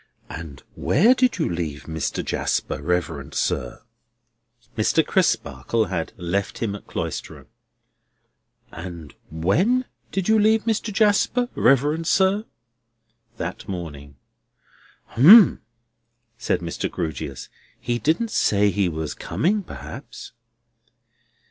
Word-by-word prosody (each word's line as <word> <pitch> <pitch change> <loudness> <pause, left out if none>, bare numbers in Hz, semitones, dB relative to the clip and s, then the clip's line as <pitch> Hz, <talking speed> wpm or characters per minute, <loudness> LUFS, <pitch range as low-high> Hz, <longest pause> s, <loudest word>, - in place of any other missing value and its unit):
"And 80 -4 -9
where 215 - +4
did 255 -4 +1
you 160 - 0
leave 80 -4 -4
Mr. 80 -2 -3
Jasper, 65 - -2
reverend 90 +3 -2
sir?" 60 - -2 0.9
Mr. 120 +8 +2
Crisparkle 110 - 0
had 85 -4 -3
left 95 +2 -2
him 110 -4 -2
at 105 - -11
Cloisterham. - - -5 1.3
"And 85 -3 -9 0.2
when 170 - +1 0.3
did 195 -2 -2
you 220 0 +4
leave 220 +1 +3
Mr. 220 -1 -1
Jasper, 220 +4 +2
reverend 150 +5 +2
sir?" 195 +4 +2 0.9
That - - -5
morning. 75 -7 -7 1.0
"Umps!" 185 - +8 0.8
said 120 - -1
Mr. 85 -1 -3
Grewgious. 70 -4 -5 0.3
"He 120 0 -2
didn't 175 - 0
say 100 - +2
he 95 -1 +1
was 80 -2 -4
coming, 205 +6 -1
perhaps?" 185 - -10
110 Hz, 105 wpm, -23 LUFS, -, 1.3 s, Umps